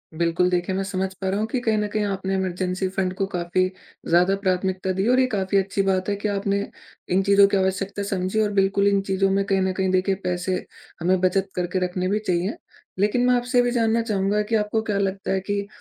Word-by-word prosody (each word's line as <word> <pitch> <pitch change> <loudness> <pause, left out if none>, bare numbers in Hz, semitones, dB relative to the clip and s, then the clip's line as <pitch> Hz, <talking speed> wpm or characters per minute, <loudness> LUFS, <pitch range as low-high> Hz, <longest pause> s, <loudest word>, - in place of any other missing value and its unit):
बिल्कुल, 170 +2 +1
देखिए 180 +1 -1
मैं 195 - -1
समझ 190 -1 -3
पा 190 - -1
रहा 195 +2 0
हूँ 215 - -1
कि 255 - 0
कहीं 220 -2 +1
न 210 0 0
कहीं 215 -1 0
आपने 195 -1 -2
इमरजेंसी 185 0 -1
फंड 185 -1 -1
को 195 +1 -1
काफ़ी 180 0 0 0.4
ज़्यादा 180 +3 +4
प्राथमिकता 185 0 0
दी 195 - +1
और 255 +1 +4
ये 260 - +4
काफ़ी 195 -1 0
अच्छी 195 +1 0
बात 190 0 0
है 205 - +1
कि 205 +1 -3
आपने 200 0 0 0.5
इन 190 +1 +3
चीज़ों 200 0 +6
की 200 - +1
आवश्यकता 195 +1 -1
समझी 195 +1 -1
और 210 -1 +1
बिल्कुल 195 +1 +2
इन 200 -1 +3
चीज़ों 195 0 +2
में 195 +1 +2
कहीं 195 -1 +1
न 190 0 0
कहीं 190 -1 +1
देखिए 185 +1 +2
पैसे 180 +1 -1 0.5
हमें 185 +2 +2
बचत 190 +1 +1
करके 180 +1 -1
रखने 180 0 -2
भी 210 +2 +1
चाहिए। 180 +3 0 0.4
लेकिन 210 +5 +2
मैं 250 - +4
आपसे 245 +1 0
ये 245 - +6
भी 245 - 0
जानना 230 -1 +2
चाहूँगा 210 -2 0
कि 215 +2 -1
आपको 215 +1 0
क्या 210 -2 -1
लगता 195 0 -2
है 190 - +1
कि, 200 +1 -3
195 Hz, 230 wpm, -23 LUFS, 185-205 Hz, 0.5 s, चीज़ों